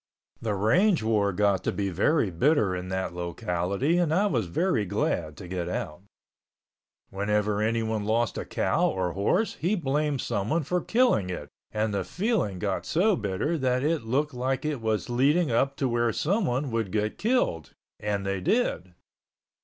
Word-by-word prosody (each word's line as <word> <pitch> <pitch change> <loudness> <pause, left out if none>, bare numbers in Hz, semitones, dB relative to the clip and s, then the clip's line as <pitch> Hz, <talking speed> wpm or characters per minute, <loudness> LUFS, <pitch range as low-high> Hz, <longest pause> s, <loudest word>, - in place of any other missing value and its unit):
The 110 -3 -1
range 165 - +3
war 105 -3 +2
got 100 0 +1
to - - 0
be 100 -1 -2
very 100 - +2
bitter 105 - +2
in 90 0 -5
that 95 -1 -2
locality 90 - -1
and 170 -3 +1
I 190 +6 +3
was 120 - 0
very 140 - +1
glad 80 -5 -1
to 90 - -9
get 90 -1 -3
out. 75 -2 -4 1.1
Whenever 105 +1 0
anyone 110 -1 0
lost 115 +2 0
a - - -3
cow - - +1
or 90 -2 -1
horse, 175 - 0
he 185 +6 +1
blamed 150 -3 0
someone 115 +9 -1
for 180 +5 -1
killing 230 - +2
it 90 - -5 0.2
and 110 0 -1
the 100 -1 0
feeling 190 - -1
got 100 0 -2
so 195 +5 +3
bitter 105 - -1
that 130 -1 +1
it 155 +1 +1
looked 135 +6 -1
like 130 +2 -2
it 150 -5 -2
was 110 -1 -1
leading 140 +5 +2
up 135 +4 +1
to 135 - 0
where 120 -1 +1
someone 150 - 0
would 115 -4 -1
get 105 0 -1
killed, 210 - 0 0.3
and 105 -2 -2
they 100 -1 -2
did. 95 - 0
110 Hz, 170 wpm, -27 LUFS, 100-150 Hz, 1.1 s, range